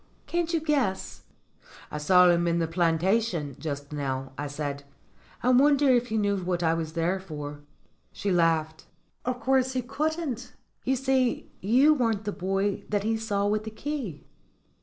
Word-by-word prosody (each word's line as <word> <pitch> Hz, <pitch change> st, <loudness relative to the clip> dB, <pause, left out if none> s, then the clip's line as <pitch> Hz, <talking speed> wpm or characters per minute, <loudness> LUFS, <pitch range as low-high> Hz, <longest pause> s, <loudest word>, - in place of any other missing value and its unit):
Can't 345 Hz, -1 st, -1 dB
you 330 Hz, -, +2 dB
guess?" 280 Hz, -11 st, -1 dB, 0.7 s
"I 150 Hz, -, -4 dB
saw 180 Hz, +4 st, +6 dB
him 175 Hz, 0 st, +3 dB
in 170 Hz, 0 st, +2 dB
the 165 Hz, -1 st, 0 dB
plantation 170 Hz, -, +1 dB
just 145 Hz, -2 st, -5 dB
now," 135 Hz, -2 st, -3 dB
I 145 Hz, +1 st, -4 dB
said. 145 Hz, -1 st, -4 dB, 0.6 s
"I 250 Hz, -, +3 dB
wonder 280 Hz, +2 st, +5 dB
if 245 Hz, -1 st, +3 dB
he 220 Hz, -1 st, -1 dB
knew 205 Hz, -1 st, +1 dB
what 180 Hz, -1 st, -2 dB
I 165 Hz, 0 st, +3 dB
was 160 Hz, -1 st, -3 dB
there 170 Hz, +3 st, 0 dB
for." 150 Hz, -5 st, -7 dB, 0.5 s
She 200 Hz, -, -2 dB
laughed. 160 Hz, -2 st, +1 dB, 0.4 s
"Of 250 Hz, 0 st, -1 dB
course 260 Hz, 0 st, +2 dB
he 255 Hz, -1 st, -1 dB
couldn't! 275 Hz, -3 st, -3 dB, 0.3 s
You 265 Hz, -, +2 dB
see, 260 Hz, -1 st, 0 dB
you 255 Hz, +10 st, +5 dB
weren't 225 Hz, -7 st, 0 dB
the 205 Hz, -, -1 dB
boy 195 Hz, +1 st, -1 dB
that 205 Hz, -1 st, 0 dB
he 225 Hz, +1 st, +1 dB
saw 205 Hz, -2 st, -1 dB
with 210 Hz, +1 st, +1 dB
the 220 Hz, -, -5 dB
key." 225 Hz, -, -5 dB
200 Hz, 165 wpm, -27 LUFS, 165-250 Hz, 0.7 s, saw